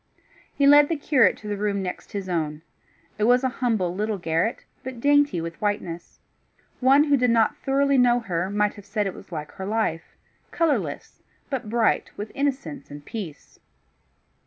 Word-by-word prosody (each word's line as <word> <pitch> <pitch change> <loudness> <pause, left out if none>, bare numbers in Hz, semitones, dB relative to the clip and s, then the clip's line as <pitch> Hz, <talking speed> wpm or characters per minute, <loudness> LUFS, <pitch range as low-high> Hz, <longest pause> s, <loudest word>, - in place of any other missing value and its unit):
He 280 - +2
led 290 +1 +7
the 330 - +1
curate 270 -8 +3
to 210 - -11
the 205 -1 -2
room 200 -1 -1
next 180 - -6
his 200 -2 -4
own. 155 -3 -2 0.6
It 210 - +2
was 245 +2 +4
a 260 - +2
humble 215 -8 +1
little 210 +2 -2
garret, 170 +5 -1 0.2
but 260 -2 -7
dainty 290 -5 +3
with 165 0 -6
whiteness. 195 -5 -3 0.6
One 270 +3 +5
who 290 -2 +3
did 250 -1 +2
not 230 -1 +3
thoroughly 275 0 +2
know 245 -1 +4
her, 185 -4 -2
might 210 0 +1
have 205 -2 -13
said 210 0 -1
it 195 - -2
was - - -13
like 150 -2 -6
her 190 - -7
life, 210 -7 -2 0.3
colourless, 330 -3 -1 0.3
but 255 -6 -3
bright 230 -1 +1
with 210 +1 -6
innocence 280 0 -3
and 145 0 -10
peace. 190 -10 -8
215 Hz, 175 wpm, -24 LUFS, 185-265 Hz, 0.6 s, led